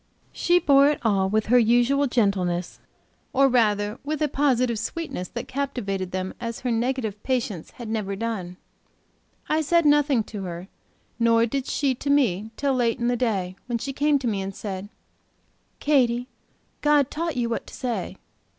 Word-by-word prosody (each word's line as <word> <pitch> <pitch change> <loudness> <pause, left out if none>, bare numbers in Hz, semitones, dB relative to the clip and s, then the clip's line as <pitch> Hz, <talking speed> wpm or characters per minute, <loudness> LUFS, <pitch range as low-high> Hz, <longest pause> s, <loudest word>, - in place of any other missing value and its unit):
She 350 0 +2
bore 280 -5 +5
it 295 - -1
all 195 -3 +2
with 215 +1 +1
her 245 +2 +5
usual 245 +5 +3
gentleness; 190 -7 0 0.5
or 275 +1 +5
rather 210 -3 +1
with 305 +2 -3
a - - +3
positive 255 -5 +1
sweetness 225 - -4
that 240 0 -6
captivated 240 -9 -3
them 185 0 -3
as 230 -1 -4
her 250 - -1
negative 230 -3 -1
patience 235 -10 -2
had 240 - -8
never 215 -3 -2
done. 195 -5 -4 0.9
I 310 +1 +2
said 335 +2 +2
nothing 290 -5 +4
to 210 -1 -7
her, 175 +1 -6 0.5
nor 230 0 +4
did 265 +3 -3
she 275 -2 +1
to 275 +3 -5
me 220 -8 +2
till 280 -1 +1
late 240 -3 +1
in 240 0 0
the 245 - +1
day, 195 -7 -1
when 240 -1 -1
she 275 +4 -5
came 290 +1 +2
to 265 -3 -3
me, 205 -4 -1
and 195 0 -5
said: 195 -1 -6 0.9
"Katy, 250 -4 +2 0.5
God 295 -2 +3
taught 330 -2 -3
you 240 -1 +1
what 230 - -3
to - - -12
say. 245 -3 -3
240 Hz, 170 wpm, -24 LUFS, 205-275 Hz, 0.9 s, bore